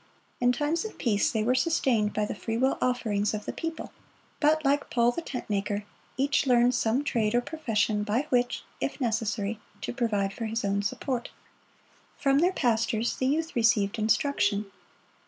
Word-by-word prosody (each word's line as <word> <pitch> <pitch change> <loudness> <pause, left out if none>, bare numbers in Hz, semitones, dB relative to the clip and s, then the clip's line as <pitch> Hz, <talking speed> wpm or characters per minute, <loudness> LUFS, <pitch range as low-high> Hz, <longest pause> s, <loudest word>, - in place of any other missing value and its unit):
In 245 0 +4
times 295 +6 0
of 440 - -7
peace 220 +4 +1
they 220 -4 0
were 245 +3 +2
sustained 255 -6 +2
by 210 0 0
the - - -4
freewill 230 +5 0
offerings 215 -5 0
of 210 - -6
the - - -4
people; 330 -1 -5 0.5
but, 310 0 +3
like 280 +1 +2
Paul 240 0 +3
the 335 - -4
tent 265 -6 -6
maker, 205 0 -1 0.3
each 275 +1 +1
learned 245 0 +4
some 240 +3 +1
trade 230 -6 0
or 245 - +4
profession 225 -8 -1
by 220 +7 0
which, 245 -1 +1 0.2
if - - -3
necessary, 220 -3 -1 0.2
to - - -4
provide 210 -6 0
for 230 - -4
his 225 0 -2
own 200 0 +1
support. 240 +4 -3 0.9
From 275 0 +3
their 355 +4 +3
pastors 230 -3 +1
the 260 - 0
youth 320 +4 -1
received 225 -3 +2
instruction. 215 -2 +1
235 Hz, 170 wpm, -28 LUFS, 215-270 Hz, 0.9 s, In